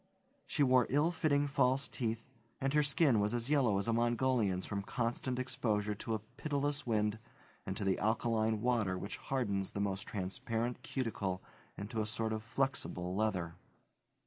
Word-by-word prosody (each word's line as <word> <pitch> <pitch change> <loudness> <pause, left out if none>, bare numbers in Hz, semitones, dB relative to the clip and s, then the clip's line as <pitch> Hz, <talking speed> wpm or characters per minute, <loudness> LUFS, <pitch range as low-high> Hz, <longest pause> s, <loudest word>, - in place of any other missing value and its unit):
She 145 - +2
wore 130 -3 +5
ill 150 +5 +3
fitting 145 -4 +2
false 135 -1 +2
teeth, 115 -2 -3 0.3
and 135 +1 0
her 150 - +5
skin 140 - +4
was 105 +3 +1
as 120 +4 -2
yellow 125 -9 +4
as 100 - 0
a 115 - +2
Mongolian's 120 -5 +2
from 100 -1 -2
constant 120 +4 -2
exposure 115 -5 0
to 110 +2 -3
a - - -2 0.2
pitiless 145 -2 -1
wind 105 -1 +1 0.5
and 95 - -3
to - - -3
the 95 -1 +2
alkaline 110 0 +1
water 110 -6 +1
which 100 +3 -5
hardens 100 -8 -1
the - - -3
most 100 +1 -1
transparent 115 +5 -2
cuticle 100 -8 -2 0.3
into 110 +3 -3
a 105 - -2
sort 110 0 0
of 110 - -2
flexible 115 -7 -2
leather. 95 -6 -1
115 Hz, 165 wpm, -34 LUFS, 105-130 Hz, 0.5 s, wore